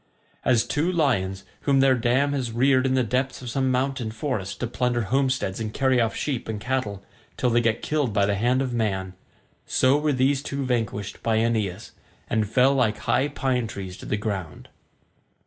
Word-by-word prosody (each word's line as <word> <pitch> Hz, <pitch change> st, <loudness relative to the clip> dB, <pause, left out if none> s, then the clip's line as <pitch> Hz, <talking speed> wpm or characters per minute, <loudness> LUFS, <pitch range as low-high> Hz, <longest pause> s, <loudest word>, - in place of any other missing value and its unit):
As 120 Hz, -3 st, +3 dB
two 160 Hz, +5 st, 0 dB
lions 100 Hz, -, 0 dB, 0.2 s
whom 140 Hz, -1 st, +2 dB
their 135 Hz, 0 st, +5 dB
dam 130 Hz, +4 st, +1 dB
has 130 Hz, -4 st, -2 dB
reared 130 Hz, +2 st, +3 dB
in 130 Hz, -, +1 dB
the 130 Hz, -, +3 dB
depths 130 Hz, +3 st, -1 dB
of 120 Hz, -, -5 dB
some 130 Hz, +1 st, +1 dB
mountain 130 Hz, -2 st, 0 dB
forest 110 Hz, -4 st, -3 dB
to -, -, +1 dB
plunder 120 Hz, 0 st, 0 dB
homesteads 130 Hz, -3 st, 0 dB
and 110 Hz, -1 st, -3 dB
carry 130 Hz, 0 st, +2 dB
off 115 Hz, -1 st, 0 dB
sheep 130 Hz, -5 st, -3 dB
and 110 Hz, -2 st, -3 dB
cattle 110 Hz, -5 st, -2 dB, 0.3 s
till 125 Hz, -, +1 dB
they 120 Hz, +1 st, +3 dB
get 115 Hz, -1 st, 0 dB
killed 150 Hz, -6 st, 0 dB
by 100 Hz, -1 st, +2 dB
the 100 Hz, -, +1 dB
hand 120 Hz, +6 st, +1 dB
of 125 Hz, -2 st, -3 dB
man, 95 Hz, -5 st, -1 dB, 0.5 s
so 130 Hz, +3 st, +3 dB
were 150 Hz, 0 st, +1 dB
these 135 Hz, +1 st, +2 dB
two 140 Hz, -1 st, -3 dB
vanquished 110 Hz, -5 st, -2 dB
by 115 Hz, -1 st, +1 dB
Aeneas, 110 Hz, -5 st, -1 dB, 0.4 s
and 110 Hz, -2 st, 0 dB
fell 130 Hz, +4 st, +4 dB
like 120 Hz, -6 st, +1 dB
high 130 Hz, +4 st, +1 dB
pine 130 Hz, -4 st, -1 dB
trees 95 Hz, -4 st, -7 dB
to -, -, -10 dB
the 105 Hz, -, 0 dB
ground. 100 Hz, -6 st, -5 dB
120 Hz, 190 wpm, -25 LUFS, 110-130 Hz, 0.5 s, their